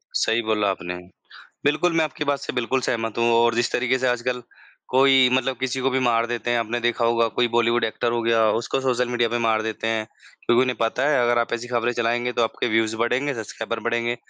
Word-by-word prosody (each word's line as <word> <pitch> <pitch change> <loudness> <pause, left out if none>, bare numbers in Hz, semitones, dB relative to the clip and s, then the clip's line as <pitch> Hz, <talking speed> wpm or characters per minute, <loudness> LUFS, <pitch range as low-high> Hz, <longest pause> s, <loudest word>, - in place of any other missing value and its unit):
सही 115 +1 +1
बोला 110 -2 0
आपने। 90 -1 -4 0.7
बिल्कुल 165 +4 +2
मैं 160 - +4
आपकी 150 0 -5
बात 140 -1 0
से - - -6
बिल्कुल 130 +1 -1
सहमत 115 -3 -2
हूँ 115 0 +2
और 115 0 +3
जिस 120 0 0
तरीक़े 125 +1 +1
से 130 - 0
आजकल 125 0 -1 0.5
कोई 130 0 +5
मतलब 130 -1 0
किसी 130 0 -2
को 135 - +1
भी 130 0 0
मार 115 -2 +2
देते 120 0 -2
हैं, 120 - +2
आपने 115 +2 -2
देखा 120 0 0
होगा 115 0 +2
कोई 120 -1 +2
बॉलीवुड 120 0 +1
एक्टर 115 +2 -2
हो 120 0 -1
गया, 115 -1 +3
उसको 115 +4 -1
सोशल 125 -2 0
मीडिया 120 -1 0
पे 120 - -1
मार 110 -1 +1
देते 110 0 -3
हैं। 110 -1 -1 0.4
क्योंकि 120 +2 +3
नहीं 125 -1 -1
पता 120 +5 0
है 135 -4 +3
अगर 120 0 +2
आप 120 - -1
ऐसी 120 +1 -4
ख़बरें 120 0 0
चलाएँगे 120 +1 0
तो 120 - +1
आपके 115 - -2
व्यूज़ 110 0 +1
बढ़ेंगे, 125 +5 0
सब्सक्राइबर 115 0 -5
बढ़ेंगे। 120 0 -1
120 Hz, 225 wpm, -23 LUFS, 115-125 Hz, 0.7 s, कोई